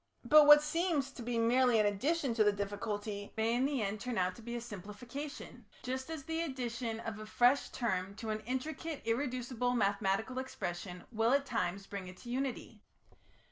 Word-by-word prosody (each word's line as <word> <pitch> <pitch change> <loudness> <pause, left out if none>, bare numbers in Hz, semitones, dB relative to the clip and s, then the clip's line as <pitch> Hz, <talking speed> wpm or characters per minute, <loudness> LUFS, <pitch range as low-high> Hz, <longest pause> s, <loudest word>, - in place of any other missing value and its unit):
But 300 -1 +8
what 295 0 +10
seems 300 -3 0
to 265 - -9
be 235 0 -2
merely 240 0 +4
an 210 - +4
addition 265 +7 +1
to 225 -1 +4
the 210 - +5
difficulty 205 0 -4
may 225 +1 +2
in 250 +2 +2
the 275 -5 0
end 200 +1 -3
turn 250 -2 -3
out 185 0 +1
to - - -12
be 235 +1 -5
a - - -2
simplification, 240 +5 -8 0.2
just 260 +3 -3
as 320 -3 -5
the 325 +3 -2
introduction 245 -6 -3
of 225 -2 -5
a 215 - -7
fresh 245 +5 +3
term 195 -5 -2
to 220 +1 -4
an 215 - -2
intricate 300 +4 -3
irreducible 245 0 -1
mathematical 200 +3 +1
expression 180 -7 -5
will 225 +2 +2
at 280 0 +3
times 200 -6 -2
bring 195 -2 -6
it 185 0 -10
to 240 - -9
unity. 265 0 -3
235 Hz, 185 wpm, -34 LUFS, 205-265 Hz, 0.2 s, what